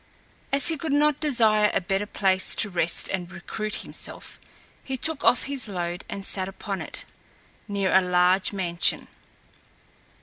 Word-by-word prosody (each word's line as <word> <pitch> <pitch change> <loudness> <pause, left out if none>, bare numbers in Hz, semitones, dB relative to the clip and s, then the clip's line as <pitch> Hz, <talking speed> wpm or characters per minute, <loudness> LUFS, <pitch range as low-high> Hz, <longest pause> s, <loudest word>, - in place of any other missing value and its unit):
As 275 +4 +5
he 325 - -1
could 300 0 -3
not 295 0 +2
desire 220 -8 +3
a - - +3
better 195 +3 -2
place 190 -2 +1
to 205 - +1
rest 170 -2 +1
and 180 -2 -4
recruit 210 +4 -6
himself, - - -6 0.4
he 265 -1 -4
took 315 +2 +2
off 245 - +4
his 275 -3 +1
load 175 -2 -5
and 195 -1 -5
sat 190 -1 +1
upon 195 0 -6
it, - - -4 0.6
near 200 -2 -1
a 190 - +6
large 180 +1 +2
mansion. 175 -4 +1
200 Hz, 155 wpm, -24 LUFS, 185-250 Hz, 0.6 s, a